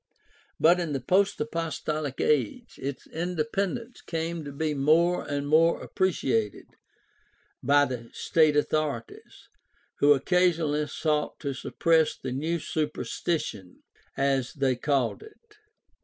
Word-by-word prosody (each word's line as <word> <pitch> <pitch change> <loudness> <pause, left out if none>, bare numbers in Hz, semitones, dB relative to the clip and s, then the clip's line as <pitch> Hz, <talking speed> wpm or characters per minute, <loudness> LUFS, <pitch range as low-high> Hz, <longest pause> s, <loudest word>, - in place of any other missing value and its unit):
But 175 +3 +5
in 165 -4 -2
the 135 - -1
post 190 +10 +2
apostolic 155 -2 -3
age 130 -8 0
its 140 0 -5
independence 180 +8 -3
came 165 0 -3
to 145 - -7
be 150 +2 -1
more 160 +5 +3
and 145 0 -2
more 165 +3 +4
appreciated 130 - -1 1.0
by 145 +2 +4
the 120 -3 -6
state 155 -2 +2
authorities, 145 -6 -2 0.5
who 145 +1 +7
occasionally 160 -1 +1
sought 150 0 -1
to 140 -2 -2
suppress 160 +4 +1
the 130 - -5
new" 155 +6 -1
''superstition," 150 - -3 0.4
as 135 -2 +1
they 135 -3 +1
called 135 -1 0
it. 435 0 -17
150 Hz, 115 wpm, -27 LUFS, 140-170 Hz, 1.0 s, who